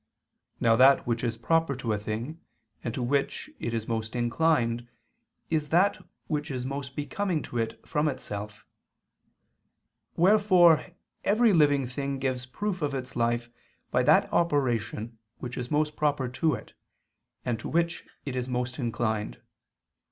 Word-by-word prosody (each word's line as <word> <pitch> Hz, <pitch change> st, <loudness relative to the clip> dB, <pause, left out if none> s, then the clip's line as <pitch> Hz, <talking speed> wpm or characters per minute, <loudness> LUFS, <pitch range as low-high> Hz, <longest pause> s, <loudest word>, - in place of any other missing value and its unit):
Now 115 Hz, -1 st, +4 dB
that 135 Hz, +2 st, +6 dB
which 120 Hz, 0 st, -1 dB
is 115 Hz, -2 st, -1 dB
proper 165 Hz, +4 st, +1 dB
to 120 Hz, -3 st, -2 dB
a -, -, 0 dB
thing 115 Hz, +10 st, -5 dB, 0.4 s
and 120 Hz, -, -2 dB
to 125 Hz, -, -2 dB
which 140 Hz, +3 st, -1 dB
it 115 Hz, -, -3 dB
is 115 Hz, -1 st, -3 dB
most 110 Hz, 0 st, -3 dB
inclined 120 Hz, -1 st, +1 dB, 0.6 s
is 155 Hz, -2 st, 0 dB
that 185 Hz, +5 st, +3 dB, 0.2 s
which 150 Hz, 0 st, -2 dB
is 130 Hz, -2 st, -3 dB
most 140 Hz, 0 st, -5 dB
becoming 165 Hz, +2 st, -1 dB
to 120 Hz, -, -4 dB
it 115 Hz, 0 st, -2 dB
from 150 Hz, -1 st, +1 dB
itself; 105 Hz, -6 st, -5 dB, 1.5 s
wherefore 185 Hz, -3 st, +5 dB, 0.4 s
every 220 Hz, +1 st, +4 dB
living 145 Hz, -5 st, +4 dB
thing 140 Hz, +2 st, -3 dB
gives 130 Hz, -1 st, -2 dB
proof 190 Hz, +6 st, -3 dB
of 145 Hz, -2 st, -1 dB
its 130 Hz, 0 st, -5 dB
life 120 Hz, 0 st, 0 dB, 0.4 s
by -, -, +3 dB
that -, -, +5 dB
operation 120 Hz, -8 st, 0 dB, 0.2 s
which 125 Hz, 0 st, -6 dB
is 125 Hz, 0 st, -4 dB
most 150 Hz, 0 st, +1 dB
proper 145 Hz, -3 st, +1 dB
to 155 Hz, +5 st, +1 dB
it, -, -, -11 dB, 0.7 s
and 120 Hz, -3 st, -1 dB
to -, -, -6 dB
which 170 Hz, +1 st, 0 dB, 0.2 s
it 135 Hz, -3 st, -4 dB
is 125 Hz, 0 st, -2 dB
most 125 Hz, +1 st, -2 dB
inclined. 110 Hz, -, -2 dB
130 Hz, 150 wpm, -28 LUFS, 120-155 Hz, 1.5 s, that